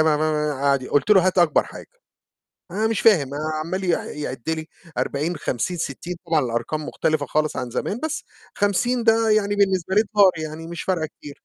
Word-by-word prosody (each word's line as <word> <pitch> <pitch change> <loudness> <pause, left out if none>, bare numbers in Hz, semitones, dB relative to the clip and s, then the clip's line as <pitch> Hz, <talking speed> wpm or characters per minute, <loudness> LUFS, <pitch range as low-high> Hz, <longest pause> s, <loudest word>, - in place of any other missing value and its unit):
قعد 150 -3 +1
قُلت 145 +9 +1
له 190 -3 +6
"هات 185 0 +1
أكبر 170 -3 +4
حاجة." - - -11 0.8
أنا 210 +5 0
مش 225 -1 0
فاهم، 165 -12 +4 0.3
عَمّال 185 +3 -3
ي 180 - +1 0.3
يعِد 130 0 -4
لي 160 -1 -3 0.3
40، 155 +5 -1
50، 150 +6 -2
60، 170 +3 -4
طبعًا 160 -2 +2
الأرقام 125 +5 -2
مختلفة 155 -2 -1
خالص 155 +2 0
عن 125 -2 -3
زمان، 210 - -3
بس 315 0 -3 0.3
50 230 +4 +1
ده 225 0 +4
يعني 205 -1 +2
بالنسبة 190 -2 +1
لي 210 - +5
دولار 200 -2 +7
يعني 155 +1 -6
مش 170 0 -6
فارقة 175 -4 0
كتير. 150 -1 -12
165 Hz, 175 wpm, -23 LUFS, 150-200 Hz, 0.8 s, دولار